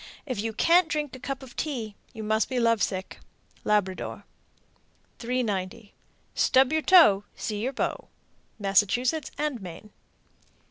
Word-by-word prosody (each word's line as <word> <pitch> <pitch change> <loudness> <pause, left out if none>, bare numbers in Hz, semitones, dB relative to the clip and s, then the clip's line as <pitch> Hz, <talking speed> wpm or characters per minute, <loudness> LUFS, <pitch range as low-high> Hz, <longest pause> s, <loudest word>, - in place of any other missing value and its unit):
If 255 -8 -3
you 225 +1 -2
can't 335 +9 +4
drink 295 -4 -3
a - - -10
cup 275 +1 -5
of 250 -2 -13
tea, 240 -9 -3 0.2
you 220 -3 -8
must 215 +1 +1
be 255 -2 -1
love 230 -2 +2
sick. 190 -1 -3 0.4
Labrador. 200 -3 -1 1.0
390. 225 -4 -3 0.4
Stub 265 +2 +3
your 315 - +2
toe 310 - +6
See 210 -1 -4
your 260 +4 -2
beau. - - -3 0.5
_Massachusetts 220 - +1
and 295 -6 -2
Maine. 185 +3 -10
235 Hz, 135 wpm, -26 LUFS, 210-270 Hz, 1.0 s, toe